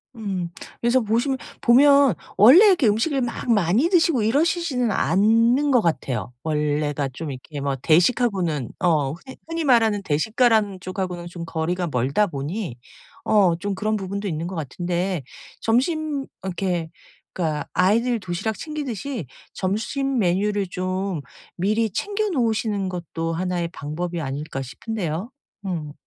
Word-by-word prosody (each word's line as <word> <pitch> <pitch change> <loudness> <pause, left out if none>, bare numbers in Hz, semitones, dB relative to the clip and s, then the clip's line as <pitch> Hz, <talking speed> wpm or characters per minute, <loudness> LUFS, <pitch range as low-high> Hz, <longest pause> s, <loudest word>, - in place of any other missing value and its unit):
음. 195 -6 -3 0.3
그래서 240 +2 +3
보시면 235 +5 0 0.2
보면 280 +1 +6 0.2
원래 260 - +9
이렇게 345 - +4
음식을 260 +7 +1
막 240 0 -2
많이 210 - +3
드시고 330 - +3
이러시지는 275 0 +1
않는 230 - +3
것 245 - +5
같아요. 140 - -2
원래가 150 -2 0
좀 155 +2 -5
이렇게 140 +3 -8
뭐 140 -1 -1
대식하고는 170 - +2
어 155 -6 +2
흔히 260 - -12
흔히 330 0 -2
말하는 225 -7 +3
대식가라는 210 - +2
쪽 185 +1 -6
하고는 180 -2 -3
좀 170 -1 -7
거리가 170 +2 -2
멀다 140 - +1
보니 150 - -4 0.5
어 195 -5 +4
좀 200 +4 -3
그런 215 +3 -1
부분도 200 +1 -4
있는 165 -1 -3
것 185 - -6
같은데 175 +3 -2 0.4
점심 285 +4 0 0.2
이렇게 180 -3 -2 0.4
그러니까 155 -4 -2
아이들 230 +6 +2
도시락 195 +3 -3
챙기듯이 275 - -4 0.3
'점심 250 +7 -1
메뉴를 200 +1 +1
좀 185 -1 -2 0.3
미리 215 +5 +1
챙겨 415 - -2
놓으시는 225 - 0
것도 165 -2 -4
1 180 +1 -1
의 170 - -1
방법이 170 +1 -4
아닐까?' 140 0 -4
싶은데요. 180 - -4 0.3
음. 160 -6 -4
195 Hz, 305 characters per minute, -23 LUFS, 165-235 Hz, 0.5 s, 원래